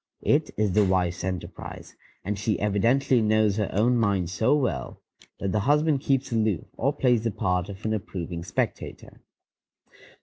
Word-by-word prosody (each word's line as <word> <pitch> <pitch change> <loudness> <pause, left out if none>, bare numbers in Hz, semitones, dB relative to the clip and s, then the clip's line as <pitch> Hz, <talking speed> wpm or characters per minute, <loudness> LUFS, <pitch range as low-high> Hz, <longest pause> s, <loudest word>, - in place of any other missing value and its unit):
It - - +2
is 105 -2 +1
the 105 +3 +4
wife's 90 -3 0
enterprise, 95 -1 -6 0.3
and 100 +1 -2
she 105 0 0
evidently 120 +6 +2
knows 110 -1 +2
her 105 -3 0
own 120 +5 +2
mind 100 -6 +1
so 110 +9 +2
well 125 - -2 0.4
that 100 - -2
the 105 - +1
husband 145 +4 +2
keeps 135 -1 0
aloof, 110 -6 0
or 135 +4 +1
plays 125 -6 +2
the 115 - +1
part 90 -3 -1
of 100 +1 -9
an 110 - 0
approving 90 -4 -5
spectator. 90 0 -4
105 Hz, 160 wpm, -26 LUFS, 95-120 Hz, 0.4 s, the